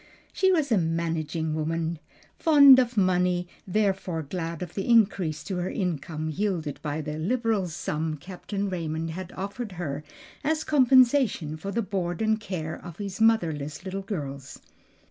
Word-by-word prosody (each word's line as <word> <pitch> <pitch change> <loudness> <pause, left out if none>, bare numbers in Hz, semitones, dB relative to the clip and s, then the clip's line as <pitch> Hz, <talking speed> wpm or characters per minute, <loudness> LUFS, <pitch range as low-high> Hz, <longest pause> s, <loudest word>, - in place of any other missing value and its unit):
She 380 0 +3
was 310 -7 +1
a 215 - +4
managing 165 -1 -1
woman, 160 +1 -2 0.4
fond 280 -4 +8
of 245 -2 0
money; 180 -2 +2 0.2
therefore 190 -4 0
glad 165 +2 -4
of 175 - -8
the 195 +3 -3
increase 195 -9 +3
to 190 -3 -4
her 180 +1 -2
income 160 -4 -3
yielded 170 -5 -2
by 150 0 -3
the 150 0 -5
liberal 220 +1 0
sum 155 -1 -3
Captain 195 +5 -5
Raymond 165 -3 -3
had 185 +2 -6
offered 200 +2 -5
her 150 -5 -4 0.4
as 310 +2 0
compensation 255 - +4
for 175 +5 -6
the 230 +2 0
board 180 -4 -2
and 220 0 +2
care 170 -7 -5
of 175 -2 -9
his 200 0 -5
motherless 165 -8 +1
little 195 +1 -3
girls. 140 -9 -6
180 Hz, 150 wpm, -26 LUFS, 160-210 Hz, 0.4 s, fond